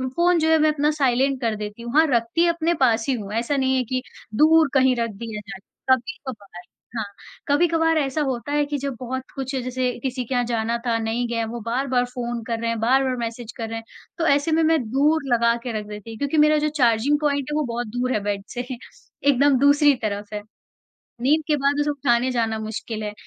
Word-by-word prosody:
Phone 345 Hz, 0 st, +3 dB
जो 320 Hz, 0 st, +2 dB
है, 320 Hz, -, +5 dB
मैं 310 Hz, 0 st, +4 dB
अपना 295 Hz, 0 st, +1 dB
साइलेंट 270 Hz, -2 st, +1 dB
कर 225 Hz, -3 st, 0 dB
देती 210 Hz, +1 st, -7 dB
हूँ। 235 Hz, +1 st, -6 dB
हाँ, 320 Hz, -, +7 dB
रखती 235 Hz, +8 st, +2 dB
अपने 335 Hz, 0 st, +1 dB
पास 225 Hz, -2 st, +2 dB
ही -, -, +3 dB
हूँ। 205 Hz, -3 st, -6 dB
ऐसा 235 Hz, +6 st, 0 dB
नहीं 265 Hz, -1 st, +2 dB
है 255 Hz, -, +1 dB
कि 255 Hz, -, +1 dB, 0.3 s
दूर 315 Hz, +2 st, +5 dB
कहीं 260 Hz, -2 st, +4 dB
रख 230 Hz, -1 st, -1 dB
दिया 220 Hz, -2 st, -5 dB
जाए। 195 Hz, -, -7 dB, 0.4 s
कभी-कभार 245 Hz, -, -9 dB, 0.3 s
हाँ, 220 Hz, -2 st, -2 dB, 0.4 s
कभी-कभार 325 Hz, +2 st, +3 dB
ऐसा 285 Hz, 0 st, 0 dB
होता 265 Hz, -1 st, -2 dB
है 295 Hz, 0 st, +2 dB
कि 290 Hz, 0 st, -3 dB
जब 275 Hz, -1 st, -4 dB
बहुत 260 Hz, +1 st, -4 dB
कुछ, 270 Hz, 0 st, -4 dB
जैसे 255 Hz, 0 st, -1 dB
किसी 255 Hz, -1 st, -2 dB
के 260 Hz, -, -4 dB
यहाँ 245 Hz, -1 st, +2 dB
जाना 230 Hz, 0 st, -1 dB
था, 230 Hz, -1 st, +1 dB
नहीं 225 Hz, +2 st, -1 dB
गए, 230 Hz, -1 st, -1 dB
वो 235 Hz, +2 st, -6 dB
बार-बार 250 Hz, +1 st, 0 dB
फ़ोन 240 Hz, -1 st, -4 dB
कर 230 Hz, -1 st, -2 dB
रहे 230 Hz, 0 st, -1 dB
हैं, 230 Hz, -1 st, -2 dB
बार-बार 260 Hz, +3 st, +2 dB
मैसेज 230 Hz, 0 st, -5 dB
कर 225 Hz, -2 st, -4 dB
रहे 225 Hz, -, -4 dB
हैं, 225 Hz, -, -7 dB, 0.3 s
तो 330 Hz, -, 0 dB
ऐसे 285 Hz, +3 st, +2 dB
में 320 Hz, +1 st, +3 dB
मैं 320 Hz, 0 st, +3 dB
दूर 300 Hz, +4 st, +3 dB
लगा 235 Hz, 0 st, +3 dB
के 245 Hz, -, -3 dB
रख 210 Hz, -, -8 dB
देती 210 Hz, +1 st, -9 dB
हूँ। 225 Hz, -, -8 dB
क्योंकि 285 Hz, +4 st, -1 dB
मेरा 305 Hz, 0 st, +5 dB
जो -, -, +1 dB
चार्जिंग 245 Hz, +4 st, +3 dB
पॉइंट 285 Hz, -2 st, 0 dB
है, -, -, -1 dB
वो 305 Hz, -, +1 dB
बहुत 240 Hz, 0 st, -3 dB
दूर 245 Hz, +3 st, -2 dB
है -, -, +1 dB
बेड 200 Hz, -1 st, -2 dB
से। 245 Hz, 0 st, -4 dB, 0.6 s
एकदम 280 Hz, 0 st, +4 dB
दूसरी 285 Hz, +1 st, +5 dB
तरफ 205 Hz, 0 st, -3 dB
है। 210 Hz, -, -3 dB, 0.8 s
नींद 295 Hz, +6 st, +3 dB
के 300 Hz, -, +2 dB
बाद 280 Hz, +1 st, +1 dB
उसे 295 Hz, -, +1 dB
उठाने 260 Hz, -3 st, +1 dB
जाना 225 Hz, -3 st, 0 dB
मुश्किल 220 Hz, 0 st, -5 dB
है। 210 Hz, -, -4 dB
255 Hz, 225 wpm, -23 LUFS, 230-290 Hz, 0.8 s, हाँ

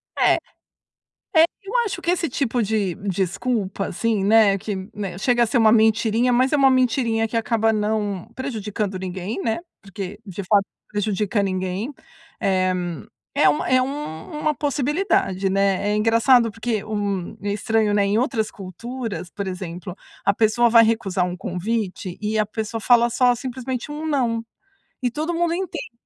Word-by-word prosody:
É -, -, +4 dB, 1.0 s
é, 320 Hz, -, +8 dB, 0.2 s
eu 395 Hz, -, -7 dB
acho 390 Hz, -4 st, -4 dB
que 345 Hz, -, +1 dB
esse 340 Hz, -2 st, 0 dB
tipo 245 Hz, -2 st, 0 dB
de 205 Hz, -4 st, 0 dB
desculpa, 195 Hz, +2 st, -1 dB
assim, 220 Hz, +1 st, 0 dB
né, 210 Hz, -1 st, +5 dB
que, 205 Hz, +1 st, -4 dB, 0.2 s
né, 195 Hz, -4 st, -5 dB
chega 240 Hz, +4 st, +2 dB
a -, -, +4 dB
ser 220 Hz, -, +1 dB
uma 220 Hz, -2 st, +6 dB
mentirinha, 225 Hz, +2 st, +3 dB
mas 255 Hz, +3 st, +3 dB
é -, -, +4 dB
uma 270 Hz, -2 st, +5 dB
mentirinha 240 Hz, -3 st, +2 dB
que 225 Hz, -, -4 dB
acaba 225 Hz, -1 st, +2 dB
não 210 Hz, -3 st, -1 dB
prejudicando 215 Hz, -6 st, -3 dB
ninguém, 190 Hz, +3 st, -4 dB
né, 225 Hz, -1 st, 0 dB, 0.2 s
porque, 200 Hz, 0 st, -7 dB
de 195 Hz, -1 st, -6 dB
fato, 200 Hz, +2 st, +4 dB
não -, -, -69 dB
prejudica 205 Hz, 0 st, 0 dB
ninguém. 190 Hz, +5 st, -2 dB, 0.5 s
Eh, 185 Hz, -1 st, +2 dB, 0.6 s
é 155 Hz, -, +5 dB
uma 150 Hz, -, +1 dB
é 255 Hz, 0 st, +4 dB
u -, -, +1 dB
uma 295 Hz, -, -3 dB
possibilidade, 285 Hz, -, 0 dB
né, 195 Hz, +1 st, +1 dB
é 210 Hz, -, +1 dB
engraçado 230 Hz, +2 st, +4 dB
porque, 225 Hz, -1 st, -2 dB
hum, 200 Hz, -4 st, -3 dB
é 205 Hz, 0 st, -1 dB
estranho, 215 Hz, 0 st, +1 dB
né, 205 Hz, -1 st, +3 dB
em 200 Hz, +1 st, +1 dB
outras 230 Hz, -3 st, 0 dB
culturas, 215 Hz, +1 st, -6 dB
por 200 Hz, +3 st, -5 dB
exemplo, 180 Hz, -1 st, -6 dB, 0.3 s
a 200 Hz, -, +4 dB
pessoa 225 Hz, +3 st, +3 dB
vai 230 Hz, 0 st, +7 dB
recusar 200 Hz, -5 st, +1 dB
um 180 Hz, 0 st, -4 dB
convite 190 Hz, 0 st, -3 dB
e 215 Hz, +1 st, 0 dB
a 215 Hz, -, +2 dB
pessoa 220 Hz, +1 st, -4 dB
fala 240 Hz, +1 st, +4 dB
só 245 Hz, +1 st, +3 dB
simplesmente 255 Hz, +2 st, -5 dB
um 300 Hz, +2 st, -5 dB
não. 250 Hz, -7 st, +1 dB, 0.6 s
E 245 Hz, -, +1 dB
todo 310 Hz, +6 st, -2 dB
mundo 340 Hz, 0 st, +1 dB
entende 350 Hz, -5 st, -4 dB
220 Hz, 165 wpm, -22 LUFS, 195-245 Hz, 1.0 s, é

